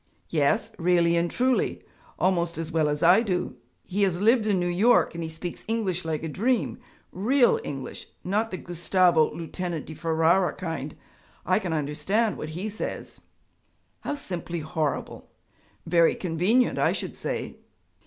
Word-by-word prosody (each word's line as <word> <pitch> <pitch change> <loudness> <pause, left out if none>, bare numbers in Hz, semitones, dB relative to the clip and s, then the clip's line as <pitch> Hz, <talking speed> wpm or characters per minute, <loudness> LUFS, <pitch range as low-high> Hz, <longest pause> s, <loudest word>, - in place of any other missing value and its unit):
'Yes, 165 +9 +1
really 170 -1 +3
and 170 0 +1
truly 255 +5 0 0.3
almost 170 -3 +1
as 165 0 -4
well 155 -2 +2
as 150 +2 -2
I 180 +6 +7
do. 180 - -2 0.3
He 200 +3 -3
has 185 -3 +2
lived 220 +2 +3
in 200 -3 +2
New 175 - 0
York 200 +8 +3
and 170 - -5
he 160 - -4
speaks 165 +2 -7
English 205 -6 -1
like 155 -1 -2
a - - -2
dream 230 - 0 0.3
real 240 +7 +3
English 135 -2 -6 0.2
not 210 +5 0
the 185 - -4
Gustavo 175 -2 +2
Lieutenant 170 -1 -4
di 160 - -8
Ferara 165 +3 +2
kind. 160 -5 -4 0.5
I 185 +2 +3
can 180 -5 -4
understand 160 +9 0
what 155 - -6
he 195 +4 -3
says.' 215 +1 -6 0.8
'How 290 - -3
simply 175 - -5
horrible!' 155 -1 -3 0.6
'Very 170 0 +4
convenient, 190 +9 +1
I - - +3
should - - -4
say.' - - -4
175 Hz, 155 wpm, -26 LUFS, 165-205 Hz, 0.8 s, I